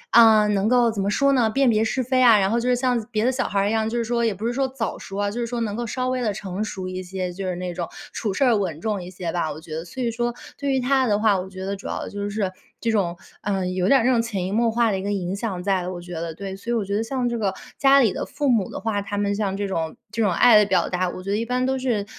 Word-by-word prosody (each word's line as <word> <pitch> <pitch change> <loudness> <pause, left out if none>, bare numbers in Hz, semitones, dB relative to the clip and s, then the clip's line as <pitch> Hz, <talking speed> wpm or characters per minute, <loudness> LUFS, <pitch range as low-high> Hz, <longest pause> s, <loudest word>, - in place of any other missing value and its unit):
啊， 220 -2 +7
能 205 0 +1
够 245 -1 +4
怎 210 -3 -3
么 195 - 0
说 275 +6 +3
呢？ 240 -4 +3
辨 270 +3 +3
别 220 -1 +3
是 240 +4 0
非 255 +1 +1
啊， 230 -4 +7
然 195 0 +2
后 230 - +1
就 245 +1 -1
是 250 - +4
像 245 -2 +1
别 215 0 0
的 255 - +3
小 260 - -1
孩 200 - 0
儿 200 +1 +2
一 - - 0
样， 220 0 +1
就 235 - -2
是 235 - +1
说 235 0 0
也 225 -2 +2
不 210 +4 -4
是 240 - -1
说 270 +2 +1
早 260 -3 -4
熟 195 - -8
啊， 205 0 0
就 235 +4 -4
是 - - 0
说 240 +1 -3
能 210 -2 -2
够 240 +1 -3
稍 255 +3 -2
微 255 0 -1
地 215 -4 0
成 195 0 -4
熟 190 -3 -5
一 185 0 -5
些， 185 -1 -4
就 195 +2 -5
是 180 - -2
那 180 0 -4
种 175 0 -3 0.3
处 210 -4 -2
事 275 - +2
儿 240 -3 +4
稳 180 -7 -2
重 205 0 -2
一 175 - -8
些 175 -2 -4
吧。 170 -3 -1
我 150 - -7
觉 160 -1 -8
得 160 - -4
所 180 +9 -7
以 240 - +1
说 240 +1 -1 0.2
对 280 -1 -1
于 265 - +2
他 260 +1 +2
的 205 -2 +2
话， 210 -3 +3
我 185 +1 -6
觉 190 0 -7
得 200 +1 -2
主 200 - -13
要 - - -3
的 - - -5
就 205 0 -4
是 205 -2 -1 0.3
这 230 - -1
种， 180 -5 0 0.2
嗯， 190 -2 -1
有 185 +1 +1
点 275 - +6
儿 230 - -1
那 - - +4
种 235 - +3
潜 205 -6 -3
移 185 - -3
默 230 +1 +2
化 235 0 +2
的 195 - 0
一 - - -5
个 205 - -2
影 190 -1 -2
响 200 -4 -3
在， 190 -2 +1
我 180 -1 -5
觉 175 0 -9
得， 165 0 -4
对。 195 +3 -6
所 230 +5 -6
以 - - +2
我 220 -3 0
觉 200 +1 -2
得 215 - +1
像 250 +1 -1
这 235 -1 -1
个 200 -4 0 0.2
家 275 0 +6
里 225 -7 +3
的 - - -3
父 285 0 -3
母 230 -7 +2
的 - - -6
话， 215 -2 -1
他 200 +1 -5
们 200 0 0
像 200 -2 -1
这 200 0 -2
种， 165 -4 -3 0.2
这 230 - +1
种 200 - +2
爱 230 +5 +6
的 210 - +6
表 190 -2 +2
达， 180 0 -1
我 185 - -7
觉 195 - -6
得 - - +2
一 230 - -1
般 250 +1 0
都 265 0 0
是 240 -6 -1
210 Hz, 355 characters per minute, -23 LUFS, 190-240 Hz, 0.3 s, 啊